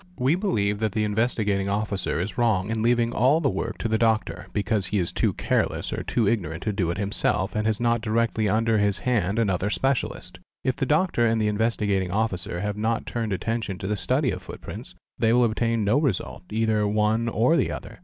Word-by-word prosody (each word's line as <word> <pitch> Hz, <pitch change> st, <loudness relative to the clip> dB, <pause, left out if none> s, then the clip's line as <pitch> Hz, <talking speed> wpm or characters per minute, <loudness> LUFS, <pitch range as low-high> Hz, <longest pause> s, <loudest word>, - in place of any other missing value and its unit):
We 130 Hz, +3 st, +2 dB
believe 105 Hz, -, 0 dB
that 110 Hz, -3 st, -1 dB
the 110 Hz, -, 0 dB
Investigating 105 Hz, -2 st, 0 dB
Officer 100 Hz, -3 st, -1 dB
is 95 Hz, +5 st, -3 dB
wrong 110 Hz, -4 st, +1 dB
in 110 Hz, -1 st, -1 dB
leaving 120 Hz, 0 st, +2 dB
all 130 Hz, +7 st, +3 dB
the 140 Hz, -5 st, +1 dB
work -, -, -3 dB
to -, -, -2 dB
the 110 Hz, 0 st, 0 dB
doctor, 110 Hz, -5 st, 0 dB
because 105 Hz, 0 st, 0 dB
he 105 Hz, -, -1 dB
is 90 Hz, -3 st, 0 dB
too -, -, +1 dB
careless -, -, -1 dB
or -, -, -3 dB
too 115 Hz, -4 st, 0 dB
ignorant 90 Hz, -7 st, -1 dB
to 105 Hz, -, -1 dB
do 95 Hz, -4 st, 0 dB
it 85 Hz, -, -2 dB
himself 100 Hz, -1 st, 0 dB
and 105 Hz, 0 st, 0 dB
has 110 Hz, 0 st, 0 dB
not 120 Hz, -1 st, +1 dB
directly 110 Hz, -1 st, 0 dB
under 110 Hz, +1 st, +2 dB
his 100 Hz, -1 st, +1 dB
hand 110 Hz, -5 st, 0 dB
another 100 Hz, -3 st, +1 dB
specialist. 135 Hz, +4 st, -2 dB, 0.2 s
If 130 Hz, -1 st, 0 dB
the 135 Hz, -, -2 dB
doctor 150 Hz, -6 st, +2 dB
and 115 Hz, 0 st, +1 dB
the 105 Hz, -, +1 dB
Investigating 105 Hz, -3 st, 0 dB
Officer 90 Hz, -3 st, -2 dB
have 105 Hz, 0 st, -2 dB
not 115 Hz, +2 st, -1 dB
turned 115 Hz, -3 st, -3 dB
attention 110 Hz, 0 st, -2 dB
to -, -, -7 dB
the 105 Hz, +2 st, 0 dB
study -, -, 0 dB
of -, -, -5 dB
footprints, -, -, -9 dB, 0.2 s
they 110 Hz, 0 st, +3 dB
will 125 Hz, +1 st, +5 dB
obtain 115 Hz, 0 st, +1 dB
no 105 Hz, +8 st, +3 dB
result, 120 Hz, -, -2 dB
either 110 Hz, -1 st, +1 dB
one 110 Hz, +2 st, +1 dB
or 120 Hz, +8 st, +3 dB
the -, -, +1 dB
other. -, -, -8 dB
110 Hz, 210 wpm, -25 LUFS, 100-115 Hz, 0.2 s, will